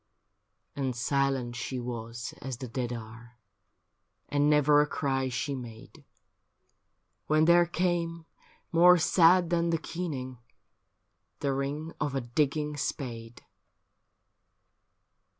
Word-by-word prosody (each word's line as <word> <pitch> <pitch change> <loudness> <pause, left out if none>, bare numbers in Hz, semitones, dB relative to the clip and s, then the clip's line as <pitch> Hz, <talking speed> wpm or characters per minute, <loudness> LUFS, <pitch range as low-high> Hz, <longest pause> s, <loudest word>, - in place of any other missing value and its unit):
And 130 -3 -2
silent 130 0 0
she 125 +2 -4
was 115 -1 -6
as 130 -2 -5
the 130 - -6
dead 120 +1 -3
are, 115 +1 -9 0.9
And 145 0 +2
never 150 0 +5
a 150 - +1
cry 135 -3 -1
she 130 +3 -2
made, 125 +4 -10 1.2
When 155 +1 +3
there 170 +1 +5
came, 170 -1 -1 0.5
more 180 +2 +7
sad 175 +1 +4
than 170 0 +1
the 165 - +2
keening, 145 -7 -5 1.0
The 140 -1 0
ring 145 +4 -3
of 145 -3 -1
a 135 - 0
digging 150 +4 -1
spade. 120 -5 -5
140 Hz, 110 wpm, -29 LUFS, 120-160 Hz, 1.2 s, more